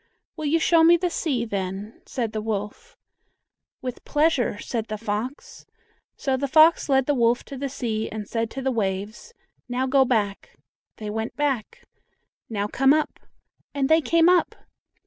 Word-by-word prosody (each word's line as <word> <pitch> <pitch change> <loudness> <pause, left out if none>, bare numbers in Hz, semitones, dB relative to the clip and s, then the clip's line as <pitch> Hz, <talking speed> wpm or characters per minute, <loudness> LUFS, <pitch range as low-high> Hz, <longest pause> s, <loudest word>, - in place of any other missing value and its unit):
"Will 310 - -5
you 300 +3 +3
show 325 0 +4
me 340 +1 +7
the 355 0 -1
sea, 265 -9 -1
then?" 200 0 -5
said 235 -4 -3
the 215 - -3
wolf. 220 - -5 0.9
"With 250 -1 -5
pleasure," 295 -8 +1
said 225 +1 -4
the 215 - -4
fox. 225 +5 -5 0.5
So 270 -2 0
the 280 +2 -2
fox 310 +3 +5
led 265 -1 +3
the 290 - +2
wolf 240 -2 +2
to 275 - -9
the 275 +1 -3
sea, 225 -4 -3
and 210 -2 -6
said 225 0 -2
to 270 +2 -6
the 265 - +1
waves, 210 - -3 0.3
"Now 250 +1 0
go 265 +1 +4
back," 210 -6 -2 0.4
they 210 -1 -5
went 220 +1 -4
back. 290 - -2 0.7
"Now 205 -3 -2
come 270 +6 +3
up," 310 - -2 0.6
and 275 -1 0
they 320 +1 +5
came 335 +2 +3
up! 360 -1 +3
255 Hz, 165 wpm, -24 LUFS, 215-295 Hz, 0.9 s, me